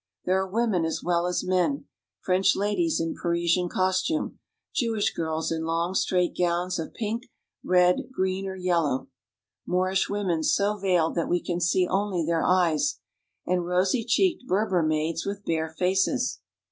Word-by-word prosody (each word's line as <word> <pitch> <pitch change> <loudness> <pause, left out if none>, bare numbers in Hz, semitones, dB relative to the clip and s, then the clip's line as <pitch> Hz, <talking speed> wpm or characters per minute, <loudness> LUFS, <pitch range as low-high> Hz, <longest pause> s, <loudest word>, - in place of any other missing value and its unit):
There 185 +1 +2
are 190 - -3
women 215 -4 +1
as 160 - -2
well 175 0 +1
as 180 - -1
men: 185 +10 0 0.4
French 190 +1 +2
ladies 195 -5 0
in 165 0 -1
Pari 170 0 0
sian 175 +1 +2
costume; 190 - 0 0.3
Jewish 225 -5 0
girls 160 0 -2
in 160 0 -2
long, 165 +2 -1
straight 180 -2 +1
gowns 175 0 0
of 160 - -6
pink, 230 +2 -3 0.4
red, 180 +3 +3
green, 190 -4 -1
or 190 - -5
yellow; 170 -8 0 0.6
Moorish 185 +1 +1
women 190 -5 -1
so 200 +6 +2
veiled 180 -5 +1
that 170 - -1
we 175 - +2
can 175 0 -3
see 180 +1 +2
only 190 -3 0
their 165 0 +1
eyes; 180 - +2 0.5
and 180 -1 0
rosy 185 +6 +1
cheeked 255 - +1
Berber 190 -2 +1
maids 155 +1 0
with 200 0 -5
bare 160 -1 -1
faces. 190 - 0
180 Hz, 160 wpm, -26 LUFS, 170-195 Hz, 0.6 s, red